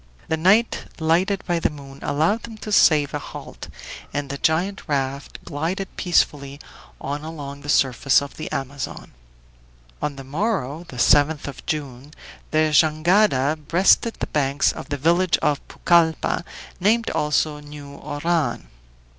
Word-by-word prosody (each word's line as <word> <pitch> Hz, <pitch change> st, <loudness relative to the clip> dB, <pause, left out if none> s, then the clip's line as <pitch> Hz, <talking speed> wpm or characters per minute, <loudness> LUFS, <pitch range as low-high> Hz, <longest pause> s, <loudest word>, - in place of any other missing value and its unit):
The 160 Hz, -, +2 dB
night, 195 Hz, +8 st, +3 dB
lighted 180 Hz, +5 st, +1 dB
by 175 Hz, -2 st, 0 dB
the -, -, +1 dB
moon, 140 Hz, -2 st, -11 dB
allowed 165 Hz, +10 st, +1 dB
them 225 Hz, -2 st, -9 dB
to 215 Hz, -, -5 dB
save 150 Hz, -7 st, +4 dB
a -, -, -1 dB
halt, -, -, -9 dB, 0.4 s
and 145 Hz, -1 st, -3 dB
the 140 Hz, -, -5 dB
giant 180 Hz, +5 st, +1 dB
raft 140 Hz, -2 st, -2 dB
glided 175 Hz, +6 st, -3 dB
peacefully 140 Hz, -5 st, 0 dB, 0.4 s
on 145 Hz, +2 st, -4 dB
along 145 Hz, -3 st, -7 dB
the 145 Hz, -, -9 dB
surface 135 Hz, -1 st, +3 dB
of 140 Hz, -1 st, -8 dB
the 155 Hz, -, -6 dB
Amazon. 135 Hz, +1 st, -5 dB, 0.9 s
On 150 Hz, -1 st, -2 dB
the 135 Hz, -, -9 dB
morrow, 160 Hz, -, -2 dB
the 125 Hz, -, -10 dB
7th 145 Hz, +5 st, +3 dB
of 140 Hz, -, -8 dB
June, 145 Hz, -3 st, -4 dB, 0.4 s
the 155 Hz, 0 st, +2 dB
jangada 155 Hz, -1 st, +3 dB
breasted 195 Hz, +6 st, +4 dB
the -, -, -3 dB
banks 140 Hz, -1 st, +1 dB
of -, -, -9 dB
the 145 Hz, -, -2 dB
village 170 Hz, +5 st, +3 dB
of 145 Hz, -1 st, 0 dB
Pucalppa, 170 Hz, 0 st, +2 dB, 0.3 s
named 225 Hz, +5 st, +2 dB
also 150 Hz, 0 st, 0 dB
New 145 Hz, -1 st, -11 dB
Oran. 145 Hz, -, -2 dB
150 Hz, 145 wpm, -22 LUFS, 140-175 Hz, 0.9 s, save